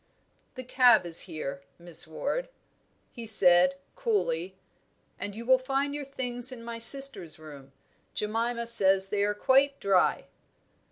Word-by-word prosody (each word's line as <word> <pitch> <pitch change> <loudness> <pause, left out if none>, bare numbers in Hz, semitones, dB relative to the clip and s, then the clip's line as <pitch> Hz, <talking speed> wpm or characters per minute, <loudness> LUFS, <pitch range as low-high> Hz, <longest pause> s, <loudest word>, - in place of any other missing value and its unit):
"The 255 - -9
cab 245 -5 +3
is 165 -1 +2
here, 140 -4 -7 0.2
Miss 170 -2 -1
Ward," 285 - -5 0.6
he 235 -1 -10
said, 180 -3 +4 0.2
coolly; 190 - -3 0.6
"and 205 0 -8
you 230 +1 -9
will 260 +1 +3
find 275 +2 -3
your 290 -1 -7
things 250 -2 -4
in 240 -2 -11
my 230 0 -8
sister's 270 - +5
room. 145 -4 -15 0.4
Jemima 230 +3 -4
says 195 -4 +3
they 205 0 -3
are 205 0 -1
quite 275 +4 +1
dry." 195 -2 0
230 Hz, 135 wpm, -26 LUFS, 180-260 Hz, 0.6 s, sister's